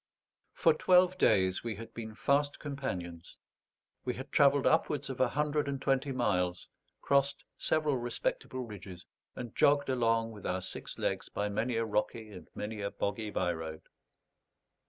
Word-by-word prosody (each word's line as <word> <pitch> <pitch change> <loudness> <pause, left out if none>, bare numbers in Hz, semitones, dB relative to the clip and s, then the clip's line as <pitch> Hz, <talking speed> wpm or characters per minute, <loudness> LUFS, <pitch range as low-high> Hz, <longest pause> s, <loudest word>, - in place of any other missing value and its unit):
For 165 -3 +4
twelve 180 +3 +4
days 95 -1 +3
we 115 -2 -3
had 115 +3 -9
been 110 -2 -7
fast 145 +4 +1
companions; 90 - -5 0.7
we 125 - -2
had 130 - -8
travelled 140 -1 +5
upwards 150 -4 +2
of 130 - -4
a 130 - +5
hundred 150 +2 0
and 140 -1 -2
twenty 135 +1 +1
miles, 90 -8 0 0.3
crossed 140 0 +2
several 155 -3 +1
respectable 120 +1 -2
ridges, 95 -4 -9 0.3
and 120 -3 -7
jogged 140 -1 +4
along 115 -3 +2
with 105 -3 -11
our 95 0 -1
six 95 - -6
legs - - -2
by 105 0 -2
many 115 +4 -1
a 115 0 +1
rocky 110 0 -2
and 90 -3 -11
many 105 0 -4
a 100 - -1
boggy 105 +2 -3
by 90 -3 0
road. 80 -1 -6
115 Hz, 155 wpm, -32 LUFS, 100-140 Hz, 0.7 s, travelled